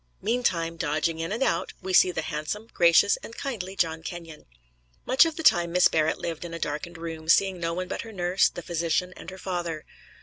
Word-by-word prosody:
Meantime, 185 -8 0
dodging 160 +1 -1
in 165 +3 -3
and 230 +5 0
out, 170 -10 0
we 185 0 -5
see 185 - +6
the 160 -3 -3
handsome, 155 +8 -4
gracious 170 +3 +5
and 230 - -10
kindly 200 -9 -4
John 160 -3 0
Kenyon. 165 -2 -9 0.6
Much 260 +5 +5
of 325 -1 -2
the 320 - -5
time 175 - +4
Miss 180 +1 +5
Barrett 155 0 +1
lived 165 -1 -5
in 170 -1 -6
a - - -6
darkened 155 +3 -4
room, 165 -1 -7
seeing 190 +1 +4
no 165 0 -2
one 185 +1 -3
but - - -4
her 225 - -9
nurse, 180 -1 +2
the 175 - -8
physician 170 +2 -1
and - - -9
her 190 - -10
father. 175 -4 -4
170 Hz, 210 wpm, -26 LUFS, 165-190 Hz, 0.6 s, see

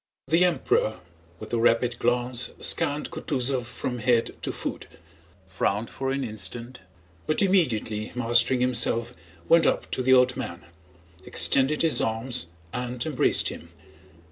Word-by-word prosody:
The 165 +3 +4
Emperor 165 -10 +1 0.4
with - - -9
a 120 - +1
rapid 120 +1 +2
glance 120 +1 0
scanned 145 +1 0
Kutúzov 130 -3 -2
from 125 0 -5
head 120 0 +1
to - - -2
foot, - - -6 0.6
frowned 100 +4 -2
for 135 0 -4
an 135 0 -1
instant, 120 +2 -6 0.5
but 155 +6 +1
immediately 115 - 0
mastering 120 +1 +3
himself 120 -1 +1 0.3
went 165 0 +5
up - - -1
to - - -1
the 130 +1 +3
old 125 0 +4
man, 95 -9 -6 0.6
extended 140 - +2
his 165 - +4
arms 115 -1 -2 0.3
and 125 +1 -3
embraced 150 -5 +3
him. - - -10
125 Hz, 135 wpm, -25 LUFS, 115-135 Hz, 0.6 s, went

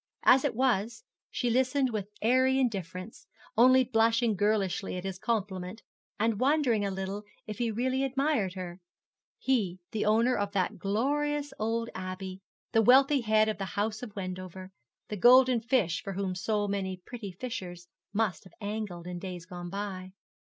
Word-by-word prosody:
As 260 +1 +6
it 275 -6 0
was, 240 - 0 0.3
she 245 -2 -1
listened 260 +1 +2
with 205 -3 -3
airy 260 +3 +4
indifference, 190 -4 -3 0.3
only 255 +3 +6
blushing 230 -1 +2
girlishly 200 -2 0
at 180 - -5
his 190 -1 -5
compliment, 200 -2 -3 0.4
and 220 -1 +1
wondering 260 -6 +2
a 200 - 0
little 195 +2 -4 0.2
if 215 +1 -7
he 235 -1 +1
really 255 +4 0
admired 270 - 0
her 180 -1 -6 0.6
he 205 -9 0
the 215 - -1
owner 230 +4 +3
of 205 0 -2
that 185 -3 -1
glorious 285 +8 0
old 230 +1 -1
Abbey 185 0 -6 0.3
the 225 - +4
wealthy 270 +4 +6
head 215 -1 +3
of 215 -1 -2
the 195 - -2
house 215 +1 -1
of 225 -5 -8
Wendover 185 -1 -6 0.4
the 210 - -3
golden 250 +2 +6
fish 225 -8 +1
for 195 - -5
whom 190 -1 -2
so 205 +3 -1
many 190 -2 -2
pretty 205 +2 -8
fishers 180 -4 -6 0.2
must 205 -5 0
have 185 - -16
angled 205 -5 -4
in 180 0 -5
days 180 -2 -7
gone 175 -1 -7
by. 190 -1 -5
210 Hz, 160 wpm, -29 LUFS, 190-245 Hz, 0.6 s, As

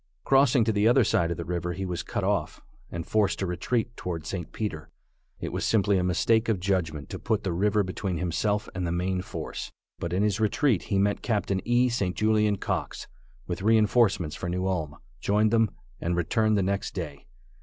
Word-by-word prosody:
Crossing 135 -3 +4
to 110 - +1
the 105 +1 +2
other 120 +2 +5
side 85 -4 +2
of 85 - -2
the 85 - -5
river 90 0 -2
he 95 +2 -4
was 90 -2 -3
cut - - -3
off, - - -1 0.3
and 85 -1 -5
forced 105 -2 +1
to 95 - -1
retreat 115 +7 -1
toward 85 -3 -5
St. 85 -1 -5
Peter. 80 -9 -4 0.5
It - - -5
was - - -2
simply 100 -3 +3
a - - 0
mistake 110 +6 +2
of 105 -5 +1
judgment 85 -6 -1
to - - -5
put 110 -2 -1
the 95 - -1
river 105 +4 +2
between 95 -1 -3
himself 90 +5 0
and 90 -1 -2
the - - -1
main 90 +1 -1
force, - - -6 0.3
but 85 - -3
in 95 +3 +1
his 105 0 +1
retreat 110 - +2
he 100 - 0
met 100 +1 +1
Capt. 105 -4 -1
E. 120 +1 +3
St. 100 -7 -1
Julian 105 -1 +2
Cox, - - -3 0.4
with - - -4
reinforcements 105 -5 +3
for 85 - -4
New 90 +1 -1
Ulm, 80 -6 -2 0.2
joined 105 +1 +2
them, 115 -2 +3 0.3
and 85 +1 -1
returned 110 +5 +2
the 100 - +2
next 100 +1 -2
day. 75 -6 -6
100 Hz, 200 wpm, -27 LUFS, 90-110 Hz, 0.5 s, other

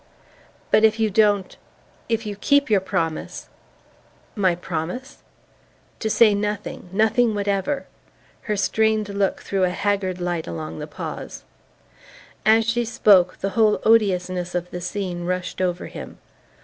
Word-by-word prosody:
"But 215 - +5
if 220 0 +4
you 220 -1 +1
don't 205 -2 +2 0.5
if 225 -1 0
you 205 -1 -4
keep 280 +4 +2
your 205 - +5
promise 165 -4 -3 0.4
" - - -33
"My 180 -2 +4
promise?" 175 +9 -5 0.8
"To 220 - -2
say 215 -1 +5
nothing... 205 -2 -3
nothing 220 +2 +2
whatever..." 205 +7 -1 0.6
Her 210 - +1
strained 220 +1 +1
look 200 -1 -1
threw 195 -1 -1
a 180 - +3
haggard 190 -1 -1
light 175 -2 -2
along 80 -1 -6
the - - -6
pause. - - -7 1.0
As 225 +1 +5
she 240 +1 +1
spoke, 200 -5 +3
the 195 - 0
whole 210 +1 +3
odiousness 185 -5 +2
of 180 0 -3
the 180 - -5
scene 180 -1 -4
rushed 180 +1 -3
over 180 0 -1
him. - - -9
200 Hz, 140 wpm, -22 LUFS, 180-220 Hz, 1.0 s, But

